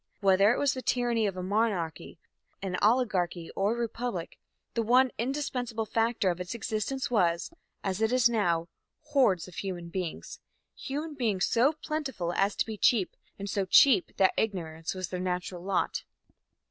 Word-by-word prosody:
Whether 195 +1 +5
it - - +1
was 285 -2 +2
the 255 - -5
tyranny 240 -4 +1
of 190 -2 -4
a 180 - -3
monarchy, 195 -5 -1 0.4
an 190 -2 -3
oligarchy 195 -7 +1
or 200 +4 +1
a - - -5
republic, 230 -6 -4 0.3
the 230 - 0
one 250 +3 +4
indispensable 245 -3 -2
factor 225 -3 +1
of 175 +1 -5
its 180 +5 -5
existence 240 +5 -2
was, 175 - +1 0.3
as 195 +1 -2
it 220 +1 +2
is 250 -2 +5
now, 175 -8 +1 0.4
hordes 255 - +2
of 180 - -12
human 175 -3 -4
beings 180 -2 -5 0.4
human 295 +3 -5
beings 220 -9 0
so 255 +6 +3
plentiful 275 - -3
as 200 +3 +1
to - - +1
be 220 -1 -6
cheap, 215 -7 +3 0.2
and 200 - -6
so 200 0 0
cheap 195 +1 +5
that 190 -1 +4
ignorance 165 -6 -2
was 185 -2 -4
their 180 - -4
natural 180 -1 -3
lot. 195 +1 -1
210 Hz, 165 wpm, -29 LUFS, 180-245 Hz, 0.4 s, Whether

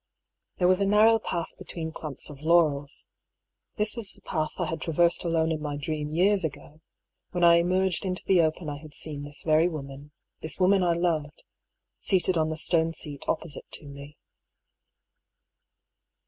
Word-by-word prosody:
There 180 - +3
was 185 +1 +4
a 200 - +2
narrow 220 +2 +5
path 170 -5 -3
between 160 -2 -5
clumps 150 -2 -4
of 140 -1 -12
laurels. 155 -4 +2 0.7
This 210 +1 0
was 210 -6 -3
the - - -10
path 155 -1 -1
I 175 - -1
had 160 +1 -4
traversed 170 +1 +2
alone 165 -1 +1
in 155 -1 -2
my 145 -1 -3
dream 150 0 -4
years 190 +4 +2
ago— 150 0 -6 0.5
when 175 -1 0
I 170 0 +7
emerged 185 +2 +1
into 185 -1 -3
the 185 -3 +4
open 160 +1 -1
I 145 -1 -5
had 150 -1 -13
seen 150 -2 -2
this 145 0 -6
very 160 +1 +4
woman 140 -2 -8
— - - -58
this 160 - -4
woman 190 +1 +4
I 175 -1 +3
loved 160 -4 -1 0.3
— - - -58
seated 185 -1 +2
on 160 -1 +2
the 160 0 -3
stone 165 0 +2
seat 145 -2 -4
opposite 165 -3 -3
to - - -5
me. 140 +1 -11
160 Hz, 175 wpm, -27 LUFS, 150-180 Hz, 0.7 s, I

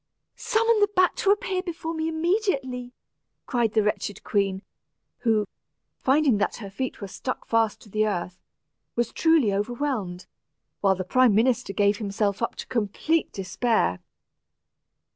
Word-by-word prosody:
"Summon 455 0 +2
this 410 0 +4
bat 370 -1 +4
to 390 - +1
appear 400 -3 +1
before 335 -2 -5
me 320 0 -2
immediately," 315 - -1 0.5
cried 235 -4 0
the 220 - +3
wretched 210 -1 -2
queen, 195 -1 0 0.6
who, 220 -3 +2 0.5
finding 270 -5 +3
that 210 - 0
her 200 -4 -8
feet 255 +3 -4
were 200 - -4
stuck 255 +6 -5
fast 225 -2 +1
to - - -15
the 215 +2 +1
earth, 180 -2 -3 0.5
was 240 -1 -1
truly 320 -11 +3
overwhelmed, 210 -4 -2 0.5
while 195 -1 +3
the 185 - -3
prime 250 +3 +4
minister 240 0 +2
gave 200 +1 +2
himself 200 -1 -1
up 230 - -1
to - - -6
complete 250 +8 0
despair. 190 - 0
230 Hz, 145 wpm, -25 LUFS, 205-310 Hz, 0.6 s, this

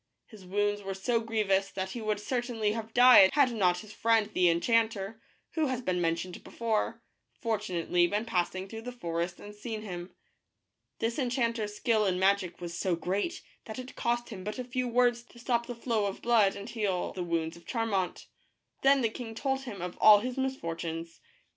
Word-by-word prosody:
His 205 -5 -14
wounds 205 +2 0
were 195 -1 -4
so 230 +5 +1
grievous 210 -4 +1
that 190 0 -4
he 235 - -5
would 215 -1 -1
certainly 235 -1 -1
have 225 0 -5
died 245 -5 +8
had 275 -3 +4
not 180 -6 +2
his 215 -1 -12
friend 225 -1 +2
the 180 -1 +4
enchanter, 220 +3 +1 0.3
who 315 -2 0
has 260 -2 -1
been 185 -7 -1
mentioned 170 +2 -2
before, 230 0 -2 0.4
fortunately 180 -6 +1
been 210 +5 -1
passing 185 -2 -1
through 225 +2 -7
the 250 +2 -6
forest 175 -6 -3
and 205 - -10
seen 215 +1 -6
him. 180 -3 -6 0.9
This 230 +4 -1
enchanters 235 -5 -1
skill 215 -1 +2
in 185 -1 +1
magic 190 -2 +1
was 170 -1 -6
so 180 0 0
great 195 - -2 0.2
that 220 - -7
it 255 0 -8
cost 240 0 -1
him 195 -5 -7
but 210 +4 -4
a 255 - -3
few 250 0 -2
words 240 0 +3
to 240 - -19
stop 235 -1 0
the 245 - -5
flow 230 -3 0
of 195 - -6
blood 225 -5 +4
and 200 - -7
heal 205 -6 -1
the 185 - -5
wounds 165 -2 -1
of 170 - -16
Charmant. 220 -6 -1 0.6
Then 275 0 +5
the 230 - +3
king 225 0 -7
told 270 +2 -1
him 200 -8 -6
of 180 -1 -5
all 210 -1 +9
his 250 +2 -3
misfortunes. 165 -10 -4
215 Hz, 190 wpm, -30 LUFS, 185-235 Hz, 0.9 s, all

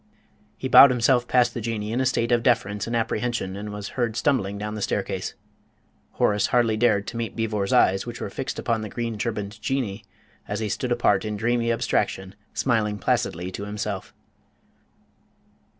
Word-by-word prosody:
He - - -3
bowed 140 - +9
himself 125 0 +2
past 125 -2 +3
the 120 - -4
Jinnee 110 -1 -3
in 125 - +1
a 130 - +2
state 115 -1 0
of 120 -1 +4
deference 105 -5 +1
and 115 - -2
apprehension, 115 -3 -1
and 105 +1 -6
was 105 0 -6
heard 120 -4 -2
stumbling 115 -7 +1
down 105 +1 -4
the 105 - -5
staircase. - - -2 0.8
Horace 105 0 +2
hardly 120 -3 +2
dared 110 -3 +2
to 120 - -6
meet 115 -1 -3
Beevor's 105 -3 -1
eyes, 95 +4 +3
which 120 -1 -6
were - - -5
fixed - - -4
upon 115 -1 -1
the 110 - -5
green 115 -1 -4
turbaned 105 -1 -4
Jinnee, 115 -6 -2 0.4
as 105 +1 -3
he 110 -1 -2
stood 125 +4 -2
apart 120 -4 +2
in 105 -1 -3
dreamy 115 +1 +1
abstraction, 95 -4 -1 0.2
smiling 110 -5 0
placidly 90 -2 -1
to 100 +2 -6
himself. 105 -2 -4
110 Hz, 175 wpm, -24 LUFS, 105-120 Hz, 0.8 s, bowed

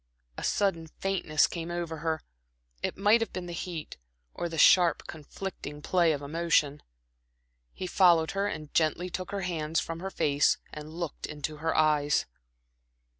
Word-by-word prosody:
A - - -7
sudden 180 -5 0
faintness 170 -3 +1
came 170 -1 -5
over 170 -2 -3
her; 160 0 -2 0.6
it - - -2
might 210 +4 +4
have 225 - -2
been 185 -1 -5
the 175 - -6
heat, 170 -2 -6 0.4
or 175 - -3
the 165 - -6
sharp, 175 0 +5
conflicting 150 -1 -7
play 175 -1 +3
of 145 -2 -3
emotion. 150 -1 +1 0.9
He 185 - -6
followed 175 -3 +4
her 200 +1 0
and 155 -7 -6
gently 170 +3 +1
took 185 0 -4
her 200 -1 -3
hands 165 -3 -1
from 165 0 -4
her 190 +2 -4
face 145 -6 +2 0.2
and 150 0 -7
looked 170 -3 -4
into 150 0 -5
her 165 +2 -1
eyes. 150 -2 +3
165 Hz, 160 wpm, -29 LUFS, 155-180 Hz, 0.9 s, sharp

